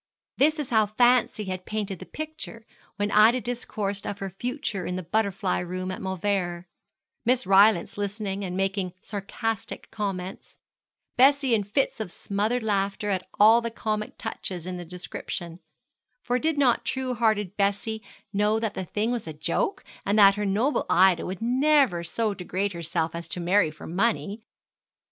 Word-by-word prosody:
This 305 +4 +4
is 295 -4 -4
how 220 -3 +3
fancy 240 0 +3
had 185 -2 -5
painted 205 -4 -3
the - - -10
picture 310 -7 -7 0.3
when 205 0 -1
Ida 220 +4 +6
discoursed 215 -4 -3
of 200 - -3
her 195 -1 -5
future 240 - -3
in 180 - -3
the 185 - -4
butterfly 195 +1 0
room 185 +1 -4
at 185 - -6
Mauleverer; 190 -2 -1 0.6
Miss 250 +1 +2
Rylance 195 0 +4
listening 205 -1 -3
and 180 -1 -3
making 195 -1 -1
sarcastic 220 +2 -4
comments; 195 -3 -5 0.6
Bessie 270 0 +5
in 215 -2 +3
fits 215 +6 0
of 215 -5 -4
smothered 215 +7 -1
laughter 205 0 0
at 185 -1 -2
all 220 +3 +7
the 230 - -2
comic 215 -2 -3
touches 175 -3 -5
in 185 0 -4
the 175 - -7
description; 175 -1 -6 0.6
for 250 +1 0
did 315 +1 0
not 260 -4 +3
true 260 -1 -2
hearted 215 -4 +1
Bessie 205 +2 0 0.3
know 210 +2 +2
that 220 -2 -2
the 190 - -4
thing 210 +6 -1
was 235 -7 -3
a 160 - -5
joke, 390 - -1 0.2
and 200 +2 +1
that 200 -2 +8
her 205 0 -2
noble 225 +9 +1
Ida 185 -1 +4
would 185 +4 -5
never 260 - +3
so 215 +5 -1
degrade 195 +1 -2
herself 165 -1 -2
as 170 0 -6
to 180 - -5
marry 180 0 +3
for 155 - -11
money? 205 +3 0
205 Hz, 165 wpm, -26 LUFS, 185-230 Hz, 0.6 s, that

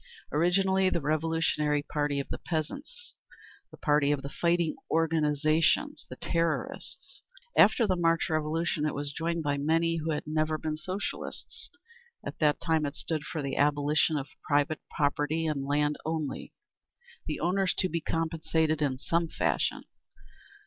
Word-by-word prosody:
Originally 190 +4 +3
the 175 - 0
revolutionary 155 -1 +1
party 145 -1 -1
of 140 - -3
the - - -4
peasants, 280 - -4 0.6
the - - -14
party 145 -1 +3
of 140 -2 0
the 140 - -4
Fighting 170 +1 +1 0.2
Organisations—the 155 -1 +2
Terrorists. 170 - -2 0.3
After 235 - +6
the 190 -3 +2
March 165 -1 +2
Revolution, 155 0 0
it - - -2
was 145 0 -3
joined 165 +1 -1
by 145 -1 0
many 165 +3 +2
who 160 0 -3
had 150 -2 -1
never 155 0 0
been 155 0 -3
Socialists. 185 +6 -5 0.6
At - - -6
that 150 -2 +3
time 160 -1 +1
it 140 - -6
stood 155 -2 -2
for 155 -1 -4
the 135 -1 -3
abolition 145 +1 +3
of 140 -1 -4
private 145 +1 +1
property 150 +2 0
in 145 -3 -1
land 145 +1 +1
only, 155 -3 -3 0.8
the - - -2
owners 190 +2 +1
to 185 - +1
be 170 -1 -2
compensated 160 -1 0
in 135 -3 +1
some 165 +5 0
fashion. - - 0
155 Hz, 145 wpm, -29 LUFS, 150-165 Hz, 0.8 s, After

